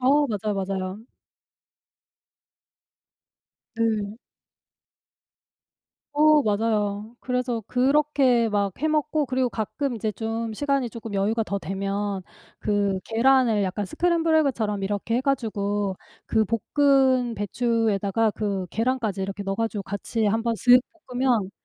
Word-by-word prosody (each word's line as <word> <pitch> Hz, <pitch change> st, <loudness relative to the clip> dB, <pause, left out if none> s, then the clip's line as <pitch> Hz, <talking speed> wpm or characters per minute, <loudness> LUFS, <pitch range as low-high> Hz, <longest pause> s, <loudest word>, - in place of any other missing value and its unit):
어 285 Hz, +3 st, +4 dB
맞아요, 210 Hz, -2 st, -2 dB
맞아요. 195 Hz, +2 st, -4 dB, 2.7 s
네. 220 Hz, -2 st, -1 dB, 2.0 s
어 305 Hz, 0 st, +6 dB
맞아요. 210 Hz, 0 st, -1 dB
그래서 250 Hz, -2 st, -2 dB
그렇게 260 Hz, -3 st, +3 dB
막 205 Hz, -1 st, +1 dB
해 315 Hz, -, 0 dB
먹고 305 Hz, -1 st, +1 dB
그리고 255 Hz, -1 st, 0 dB
가끔 240 Hz, +4 st, -3 dB
이제 215 Hz, 0 st, -2 dB
좀 225 Hz, +1 st, -3 dB
시간이 275 Hz, -1 st, 0 dB
쪼끔 225 Hz, -1 st, -8 dB
여유가 215 Hz, +3 st, +1 dB
더 200 Hz, -2 st, -3 dB
되면 195 Hz, +2 st, -3 dB, 0.4 s
그 200 Hz, -2 st, 0 dB
계란을 230 Hz, -2 st, +3 dB
약간 195 Hz, +2 st, -2 dB
스크램블 335 Hz, -, +1 dB
에그처럼 225 Hz, -10 st, 0 dB
이렇게 205 Hz, +3 st, -2 dB
해 -, -, +2 dB
가지고 205 Hz, -7 st, -1 dB, 0.3 s
그 220 Hz, -1 st, +2 dB, 0.3 s
볶은 265 Hz, -4 st, +4 dB
배추에다가 220 Hz, -1 st, +1 dB
그 200 Hz, -3 st, -2 dB
계란까지 225 Hz, -4 st, -1 dB
이렇게 195 Hz, +1 st, -4 dB
넣어 195 Hz, 0 st, -1 dB
가지고 225 Hz, -3 st, -2 dB
같이 205 Hz, +3 st, -3 dB
1 225 Hz, +2 st, +1 dB
번 235 Hz, 0 st, 0 dB
쓱 250 Hz, +2 st, +6 dB, 0.3 s
볶으면 245 Hz, -6 st, 0 dB
225 Hz, 250 characters per minute, -24 LUFS, 205-255 Hz, 2.7 s, 어